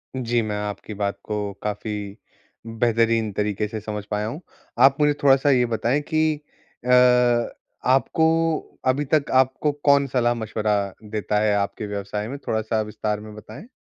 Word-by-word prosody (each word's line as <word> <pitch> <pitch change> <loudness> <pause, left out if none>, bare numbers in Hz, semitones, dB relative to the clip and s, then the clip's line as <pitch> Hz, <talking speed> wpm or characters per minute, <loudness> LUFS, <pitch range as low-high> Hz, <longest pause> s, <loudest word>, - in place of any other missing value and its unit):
जी, 120 -2 0
मैं 105 -1 -3
आपकी 105 +1 -6
बात 100 -1 -2
को 105 -2 -3
काफ़ी 105 0 -4 0.5
बेहतरीन 115 -1 +1
तरीके 105 +1 -1
से 110 0 -5
समझ 105 -1 -5
पाया 105 +1 -1
हूँ। 145 +10 -6 0.4
आप 135 +2 +6
मुझे 150 0 +4
थोड़ा-सा 135 +1 +5
ये 125 -2 +4
बताएँ 120 +6 +1
कि 155 -1 +1 0.4
अ, - - -3 1.0
आपको 135 +4 +3 0.6
अभी 140 +3 +2
तक 150 -2 +3
आपको 130 +3 +3
कौन 140 -1 +5
सलाह-मशविरा 115 -4 0 0.3
देता 105 0 -1
है 105 -1 +2
आपके 100 +1 -2
व्यवसाय 105 +1 -4
में? 140 +4 -5
थोड़ा-सा 110 0 0
विस्तार 105 0 -3
में 105 0 -10
बताएँ। 150 - -11
110 Hz, 150 wpm, -23 LUFS, 105-130 Hz, 1.0 s, आप